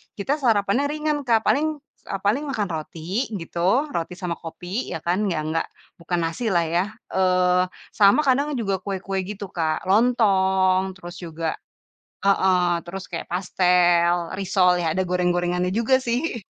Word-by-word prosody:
kita 280 Hz, +9 st, -1 dB
sarapannya 230 Hz, +2 st, +2 dB
ringan 300 Hz, 0 st, -1 dB
Kak, 225 Hz, -2 st, +4 dB
paling, 305 Hz, +1 st, +1 dB, 0.3 s
eee, 195 Hz, -, -3 dB
paling 245 Hz, +9 st, +2 dB
makan 215 Hz, -8 st, -1 dB
roti 165 Hz, -, -3 dB
gitu, 185 Hz, -, 0 dB
roti 170 Hz, +2 st, -2 dB
sama 175 Hz, -3 st, -3 dB
kopi 180 Hz, +7 st, -5 dB
ya -, -, -3 dB
kan, 185 Hz, +5 st, 0 dB
yang 155 Hz, -1 st, -2 dB
nggak 165 Hz, -, 0 dB, 0.3 s
bukan 175 Hz, +1 st, -2 dB
nasi 225 Hz, +8 st, -4 dB
lah 170 Hz, -1 st, +2 dB
ya, 175 Hz, +3 st, +1 dB, 0.3 s
eee, 180 Hz, -1 st, +3 dB, 0.3 s
sama 205 Hz, +7 st, +5 dB
kadang 285 Hz, +3 st, +2 dB
juga 200 Hz, -3 st, 0 dB
kue-kue 195 Hz, -1 st, -3 dB
gitu 205 Hz, -1 st, -6 dB
Kak. 160 Hz, +1 st, -2 dB
Lontong 190 Hz, -4 st, +3 dB
terus 175 Hz, -2 st, -10 dB
juga 165 Hz, -2 st, -4 dB, 0.7 s
heeh, 180 Hz, -3 st, +3 dB
terus 190 Hz, +2 st, -6 dB
kayak 165 Hz, -, -5 dB
pastel, 175 Hz, -1 st, +3 dB, 0.2 s
risol 180 Hz, -2 st, +3 dB
ya 160 Hz, -, +1 dB
ada 190 Hz, +1 st, 0 dB
goreng-gorengannya 180 Hz, 0 st, 0 dB
juga 235 Hz, +3 st, +3 dB
sih. 245 Hz, +5 st, -1 dB
190 Hz, 150 wpm, -23 LUFS, 175-220 Hz, 0.7 s, sama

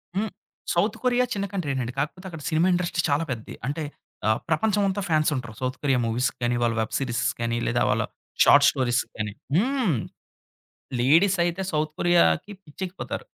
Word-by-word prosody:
హ్మ్. 215 Hz, +2 st, -1 dB, 0.4 s
South 200 Hz, +5 st, +1 dB
Korea 250 Hz, 0 st, +3 dB
చిన్న 200 Hz, -1 st, -2 dB
కంట్రీనేనండీ. 135 Hz, -9 st, -2 dB
కాకపోతే, 175 Hz, +6 st, -3 dB
అక్కడ 165 Hz, -3 st, -8 dB
సినిమా 165 Hz, +3 st, +3 dB
ఇండస్ట్రీ 175 Hz, 0 st, 0 dB
చాలా 145 Hz, +3 st, +2 dB
పెద్దది. 115 Hz, -2 st, -6 dB
అంటే 155 Hz, +2 st, -3 dB, 0.4 s
ఆహ్, 110 Hz, -, +3 dB
ప్రపంచం 205 Hz, +6 st, +2 dB
అంతా 200 Hz, +1 st, -2 dB
ఫాన్స్ 155 Hz, -1 st, +3 dB
ఉంటరు. 120 Hz, -5 st, -4 dB
సౌత్ 130 Hz, 0 st, -2 dB
కొరియా 135 Hz, -3 st, +2 dB
మూవీస్‌కి‌ 120 Hz, +4 st, 0 dB
గానీ, 120 Hz, 0 st, +1 dB
వాళ్ళ 115 Hz, -1 st, +1 dB
వెబ్ 110 Hz, -, -4 dB
సీరీస్స్‌ 125 Hz, -3 st, -1 dB
గాని, 115 Hz, 0 st, 0 dB
లేదా -, -, +1 dB
వాళ్ళ -, -, +2 dB, 0.4 s
షార్ట్ 145 Hz, 0 st, +7 dB
స్టోరీస్‌కి 125 Hz, -3 st, 0 dB
గాని. 105 Hz, -1 st, -3 dB, 0.2 s
హ్మ్. 245 Hz, -, +2 dB, 1.1 s
లేడీస్ 170 Hz, +9 st, +4 dB
అయితే, 175 Hz, +2 st, -1 dB
సౌత్ 155 Hz, 0 st, -1 dB
కొరియా‌కి 175 Hz, -, +3 dB
పిచ్చెక్కిపోతారు. 180 Hz, +5 st, -6 dB
155 Hz, 160 wpm, -25 LUFS, 125-185 Hz, 1.1 s, షార్ట్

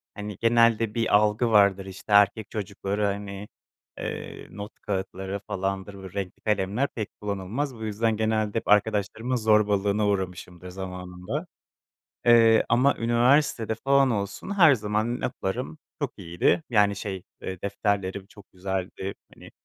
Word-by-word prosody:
hani 105 Hz, -1 st, -6 dB
genelde 115 Hz, -1 st, +3 dB
bir 115 Hz, -3 st, +2 dB
algı 105 Hz, +3 st, +3 dB
vardır, 100 Hz, -2 st, +4 dB
işte 95 Hz, +2 st, -9 dB
erkek 105 Hz, +1 st, +4 dB
çocukları, 100 Hz, 0 st, -3 dB
hani, 100 Hz, 0 st, -4 dB, 0.5 s
ııı, -, -, -7 dB
not 105 Hz, +2 st, -7 dB
kağıtları 95 Hz, -1 st, -3 dB
falandır, 95 Hz, 0 st, -4 dB
renkli 100 Hz, -1 st, -5 dB
kalemler 105 Hz, +5 st, 0 dB
pek 110 Hz, -3 st, -3 dB
kullanılmaz. 105 Hz, +7 st, -3 dB
Bu 110 Hz, -, -8 dB
yüzden 110 Hz, +1 st, 0 dB
genelde 110 Hz, -1 st, 0 dB
hep -, -, -3 dB
arkadaşlarımın 105 Hz, +4 st, +1 dB
zorbalığına 105 Hz, -2 st, +2 dB
uğramışımdır 90 Hz, -2 st, -3 dB
zamanında, 90 Hz, -, -6 dB, 0.8 s
ııı, 115 Hz, -1 st, +6 dB
ama 125 Hz, +5 st, +4 dB
üniversitede 120 Hz, 0 st, +2 dB
falan 135 Hz, +2 st, +3 dB
olsun 100 Hz, -, -3 dB
her 165 Hz, -6 st, +8 dB
zaman 110 Hz, +1 st, -1 dB
notlarım 125 Hz, +6 st, -3 dB, 0.2 s
çok 135 Hz, -6 st, -3 dB
iyiydi. 85 Hz, -, +1 dB
Yani 105 Hz, -3 st, +3 dB
şey, 95 Hz, -2 st, -5 dB, 0.2 s
ııı, 95 Hz, -2 st, -5 dB
defterlerim 100 Hz, -1 st, -1 dB
çok 105 Hz, 0 st, -16 dB
güzeldi. 95 Hz, +1 st, -4 dB, 0.2 s
Hani -, -, -14 dB
105 Hz, 130 wpm, -26 LUFS, 95-115 Hz, 0.8 s, her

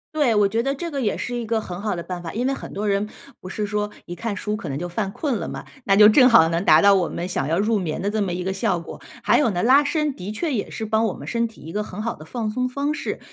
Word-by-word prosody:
对， 280 Hz, -7 st, +3 dB
我 205 Hz, -1 st, +4 dB
觉 225 Hz, +4 st, 0 dB
得 275 Hz, +2 st, -1 dB
这 335 Hz, +4 st, -5 dB
个 280 Hz, -2 st, -2 dB
也 210 Hz, -5 st, 0 dB
是 245 Hz, -, -4 dB
一 240 Hz, -, -2 dB
个 225 Hz, 0 st, 0 dB
很 180 Hz, -3 st, -6 dB
好 210 Hz, -2 st, -1 dB
的 170 Hz, -, -5 dB
办 180 Hz, 0 st, -5 dB
法。 170 Hz, -, -6 dB
因 240 Hz, +4 st, -1 dB
为 270 Hz, -, +1 dB
很 -, -, -7 dB
多 210 Hz, +1 st, -3 dB
人 200 Hz, +1 st, 0 dB, 0.3 s
不 185 Hz, -, -9 dB
是 210 Hz, +2 st, -2 dB
说 210 Hz, 0 st, -2 dB, 0.2 s
一 175 Hz, -, -7 dB
看 205 Hz, +1 st, -4 dB
书 210 Hz, +2 st, -2 dB
可 195 Hz, -7 st, -6 dB
能 135 Hz, -, -3 dB
就 175 Hz, +4 st, -3 dB
犯 195 Hz, +2 st, -3 dB
困 275 Hz, -4 st, -1 dB
了 -, -, -4 dB
吗， -, -, -7 dB, 0.2 s
那 195 Hz, -, +4 dB
就 210 Hz, +1 st, +9 dB
正 250 Hz, +4 st, +7 dB
好 230 Hz, -9 st, +7 dB
能 170 Hz, +2 st, 0 dB
达 155 Hz, -4 st, +7 dB
到 200 Hz, 0 st, +7 dB
我 185 Hz, -3 st, +2 dB
们 175 Hz, -, -4 dB
想 135 Hz, -6 st, -2 dB
要 165 Hz, +2 st, +1 dB
入 210 Hz, +2 st, +2 dB
眠 165 Hz, -5 st, -3 dB
的 200 Hz, +1 st, -1 dB
这 215 Hz, -, 0 dB
么 195 Hz, -3 st, -1 dB
一 180 Hz, +1 st, -3 dB
个 190 Hz, +1 st, -2 dB
效 195 Hz, -2 st, 0 dB
果。 170 Hz, -, -10 dB, 0.2 s
还 -, -, +4 dB
有 290 Hz, -6 st, +3 dB
呢， 175 Hz, -3 st, -1 dB
拉 270 Hz, +4 st, +6 dB
伸 300 Hz, 0 st, 0 dB
的 185 Hz, +3 st, -6 dB
确 290 Hz, +8 st, -2 dB
也 210 Hz, -, -2 dB
是 220 Hz, -, -5 dB
帮 220 Hz, +1 st, +1 dB
我 210 Hz, -, -1 dB
们 -, -, -10 dB
身 235 Hz, 0 st, 0 dB
体 220 Hz, -11 st, -17 dB
一 160 Hz, -, -8 dB
个 210 Hz, -, 0 dB
很 205 Hz, -1 st, -9 dB
好 230 Hz, -, -1 dB
的 155 Hz, -, -12 dB
放 220 Hz, +4 st, -3 dB
松 255 Hz, +3 st, -1 dB
方 280 Hz, +3 st, -1 dB
式， 300 Hz, -, -4 dB
210 Hz, 340 characters per minute, -23 LUFS, 185-235 Hz, 0.3 s, 就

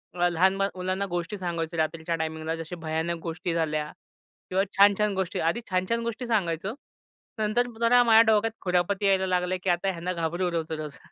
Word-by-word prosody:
अ, 175 Hz, 0 st, +3 dB
लहान 185 Hz, +3 st, +3 dB
मुलांना 190 Hz, 0 st, -1 dB
गोष्टी 175 Hz, +3 st, -3 dB
सांगायचो 170 Hz, -2 st, -3 dB
रात्रीच्या 160 Hz, +1 st, -1 dB
टायमिंगला 160 Hz, 0 st, -3 dB
जसे 165 Hz, +2 st, -6 dB
भयानक 165 Hz, +1 st, -2 dB
गोष्टी 165 Hz, +1 st, -3 dB
झाल्या. 155 Hz, -2 st, -1 dB, 0.6 s
किंवा 190 Hz, +1 st, +2 dB
छान-छान 205 Hz, +1 st, +5 dB
गोष्टी. 190 Hz, -2 st, -2 dB
आधी 165 Hz, +9 st, 0 dB
छान-छान 185 Hz, +6 st, 0 dB
गोष्टी 235 Hz, +2 st, -4 dB
सांगायचो. 195 Hz, -3 st, 0 dB, 0.7 s
नंतर 220 Hz, +3 st, +1 dB
जरा 245 Hz, +1 st, +6 dB
माझ्या 225 Hz, -1 st, +7 dB
डोक्यात 220 Hz, +1 st, +2 dB
खुरापती 180 Hz, +2 st, 0 dB
यायला 190 Hz, -1 st, +3 dB
लागल्या, 180 Hz, 0 st, 0 dB
की 190 Hz, -, 0 dB
आता 175 Hz, +2 st, +1 dB
ह्यांना 180 Hz, 0 st, -4 dB
घाबरवू 175 Hz, +2 st, -1 dB
रोज-रोज. 155 Hz, -3 st, -4 dB
180 Hz, 160 wpm, -27 LUFS, 165-195 Hz, 0.7 s, माझ्या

